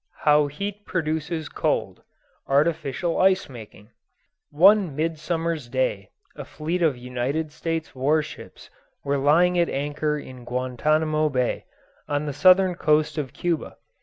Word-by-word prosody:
HOW 150 -1 +4
HEAT 200 +8 -6
PRODUCES 160 -2 -2
COLD - - -2 0.5
ARTIFICIAL 155 +2 0
ICE 190 -1 +3
MAKING 110 -3 -12 0.6
One 185 0 +4
midsummers 160 -2 -2
day 125 -6 -1 0.3
a - - -7
fleet 165 +4 -4
of 155 -6 +2
United 125 +5 -3
States 165 +1 -4
war 145 +4 +1
ships 155 - -12 0.3
were 140 0 0
lying 175 +6 +3
at 170 - +2
anchor 150 +2 -2
in 130 -3 -10
Guantanamo 155 +5 0
Bay, 125 -3 -1 0.4
on 145 +1 -1
the 145 - -3
southern 185 +5 +5
coast 155 -1 +1
of 135 -4 -4
Cuba. 170 -3 -3
150 Hz, 130 wpm, -24 LUFS, 135-165 Hz, 0.6 s, southern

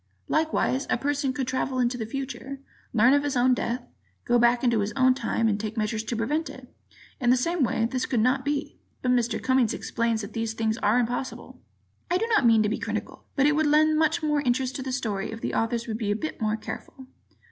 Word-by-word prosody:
Likewise, 310 -4 0
a - - +2
person 285 -1 0
could 260 -1 -3
travel 260 0 -1
into 245 0 +1
the 225 -3 -4
future, 270 +2 -5 0.3
learn 240 +4 +5
of 285 - +4
his 285 -2 -1
own 255 +1 +4
death, 245 0 -2 0.4
go 240 0 +3
back 240 +1 +3
into 235 -3 +3
his 205 +1 -1
own 260 -1 +4
time 230 -3 0
and 205 -1 0
take 220 +1 -5
measures 215 0 -1
to 230 +2 -3
prevent 295 +9 -1
it. - - -12 0.5
In 245 - +1
the 255 - +5
same 335 +4 0
way, 225 -2 +1
this 255 +2 -2
could 245 - 0
not 255 +4 +2
be. 285 +1 -3 0.2
[But 250 - +2
Mr. 240 -2 +1
Cummings 260 -4 +2
explains 230 -1 -1
that 200 - -8
these 225 -1 -2
things 220 0 -1
are 210 +4 +3
impossible. 245 +2 -3 0.5
Ed.] 350 - +1
I - - +4
do 450 - -1
not 425 - +4
mean 225 -2 +5
to 210 - +1
be 220 - -2
critical, - - -5
but 275 - +3
it 295 0 +4
would 310 0 +2
lend 310 +1 +4
much 315 0 +1
more 300 -1 +1
interest 255 0 0
to - - -5
the 260 0 -4
story 215 -7 -2
if 225 - -7
the - - -3
authors 230 +1 0
would 220 -1 -4
be 210 -3 -2
a 205 - +2
bit 310 +2 -5
more 215 0 0
careful. 260 +4 -8
250 Hz, 235 wpm, -26 LUFS, 225-275 Hz, 0.5 s, learn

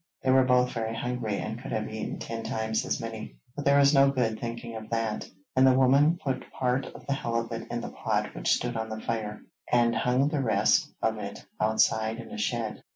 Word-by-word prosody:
They 130 - +3
were 130 0 +6
both 125 -1 +3
very 115 -1 -3
hungry 115 -3 -2
and 110 +2 -4
could - - -7
have 110 - -1
eaten 110 0 -4
ten 115 0 -5
times 110 0 -1
as - - 0
many, 115 -1 -6 0.2
but 145 - -5
there 140 0 +5
was 140 +1 +6
no 135 -1 +6
good 120 -5 0
thinking 115 0 -5
of 110 -1 -8
that, 115 -2 -2 0.3
and 130 +1 +6
the 130 -1 +5
woman 140 +5 +5
put 135 -6 -4
part 130 +1 0
of - - -12
the 140 - 0
halibut 115 -3 -3
in 120 0 -3
the - - -6
pot - - -1
which - - 0
stood 120 -1 +1
on 110 0 -3
the 110 0 -5
fire, 110 -2 -3 0.3
and 120 -1 +4
hung 125 +4 +2
the 150 -2 0
rest 125 - +3
of - - +1
it - - -7
outside 110 +1 +2
in 120 - -9
a 235 - -6
shed. 115 - -2
120 Hz, 220 wpm, -28 LUFS, 110-130 Hz, 0.3 s, were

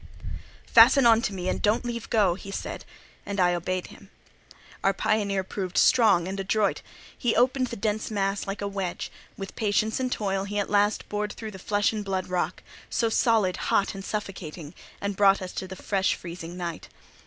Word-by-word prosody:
"Fasten 245 +3 +7
on 230 -1 +6
me, 185 -3 -5
and - - -1
don't 215 +3 +2
leave 235 -1 -4
go," 205 -6 +3
he 195 +2 -9
said; 195 - -5 0.4
and 200 -1 -4
I 180 -1 +4
obeyed 180 +1 -2
him. - - -16 0.7
Our 195 - +3
pioneer 200 -1 0
proved 185 -1 -4
strong 205 -8 +5
and 195 +1 -4
adroit; 200 +1 +1 0.3
he 240 - 0
opened 255 +1 +3
the - - -6
dense 215 +1 -2
mass 195 -2 -1
like 195 +1 -4
a - - -1
wedge; 195 -3 -4 0.3
with 195 -1 -7
patience 215 +1 +1
and 255 -1 -1
toil 195 -3 -1
he 205 +1 -4
at 200 -1 -1
last 205 0 +2
bored 210 0 -3
through 220 -1 -7
the 190 - -10
flesh 205 +3 +1
and 215 -1 -3
blood 190 -2 -3
rock—so 185 +5 -2
solid, 220 -5 +2
hot, 200 - +1
and 195 -1 -7
suffocating—and 190 -1 -6
brought 195 0 +5
us 185 -1 -6
to 190 - -4
the 190 - -8
fresh, 195 +1 0
freezing 170 0 -8
night. 170 -3 -5
200 Hz, 180 wpm, -26 LUFS, 185-215 Hz, 0.7 s, Fasten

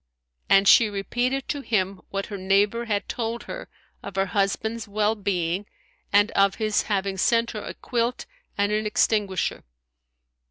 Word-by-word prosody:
And 195 0 +5
she 225 +1 +7
repeated 245 +6 -2
to 285 - -2
him 195 -6 -1
what 195 0 -3
her 205 - -6
neighbour 200 +5 +2
had 205 -3 -1
told 235 0 -3
her - - -8 0.3
of 200 - -8
her 195 0 +2
husband's 215 +4 -1
well 210 +1 +1
being 195 -2 -2 0.4
and 205 +1 +4
of 195 0 +3
his 215 -2 +1
having 195 -1 0
sent 230 +4 +2
her 215 - -5
a - - -7
quilt 240 0 -2 0.3
and 205 +1 +1
an 215 0 0
extinguisher. 205 -3 0
205 Hz, 155 wpm, -25 LUFS, 195-225 Hz, 0.4 s, she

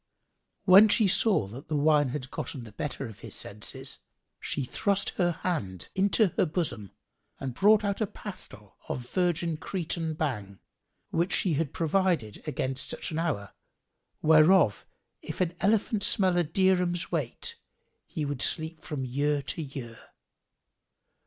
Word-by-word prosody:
When 195 +3 +8
she 215 0 +4
saw 195 - +3
that 125 +8 -10
the 155 - -2
wine 145 -1 +3
had 130 0 -5
gotten 130 - -4
the 110 - -11
better 135 +5 -4
of 110 -4 -10
his - - -8
senses, 130 +6 -4 0.4
she 140 - -2
thrust 200 - 0
her 175 -2 +1
hand 130 - -3
into 195 +1 +3
her 185 - +3
bosom 150 - -3 0.5
and 135 -2 -4
brought 210 - +4
out 200 +1 -1
a 215 - +1
pastile 130 - -10
of 125 -1 -4
virgin 175 -3 0
Cretan 165 -2 -3
Bhang, 105 -11 -3 0.5
which 170 +3 0
she 180 - +1
had 150 -1 -1
provided 165 - 0
against 135 -3 -1
such - - -4
an 160 - -2
hour, 140 - -2 0.7
whereof 155 - +5 0.3
if - - -7
an 180 -2 +1
elephant 210 +1 +1
smelt 190 -2 +4
a 175 - +3
dirham's 180 +1 +1
weight, 150 -9 -2 0.5
he 150 - -3
would 140 -2 -3
sleep 160 0 +1
from 140 -4 -4
year 145 +3 0
to 140 - -4
year. 130 -6 -7
155 Hz, 145 wpm, -28 LUFS, 130-185 Hz, 0.7 s, When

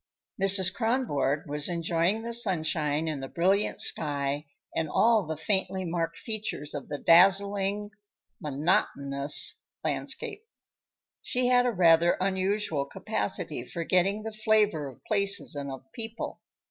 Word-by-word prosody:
Mrs. 190 -1 +7
Kronborg 200 - -1
was 145 +2 -1
enjoying 170 +5 0
the 235 0 -5
sunshine 160 -8 -1
and 150 -3 -3
the 135 - -5
brilliant 190 +7 0
sky 145 0 +1 0.3
and 160 -1 -1
all 220 -3 +3
the 160 -1 -4
faintly 190 +2 -1
marked 165 -1 -3
features 215 -10 -5
of 145 -3 -7
the 145 - -4
dazzling, 200 +4 +3 0.5
monotonous 140 -2 +1 0.2
landscape. 435 -2 -4 0.8
She 250 0 -1
had 250 0 +4
a - - +1
rather 170 -3 +4
unusual 190 -5 -1
capacity 120 - -3
for 170 +6 -5
getting 195 +5 +1
the 220 - -5
flavor 215 -8 +1
of 130 - -13
places 200 -2 +1
and 140 -1 -5
of 135 0 -9
people. 225 0 -6
180 Hz, 130 wpm, -27 LUFS, 150-210 Hz, 0.8 s, Mrs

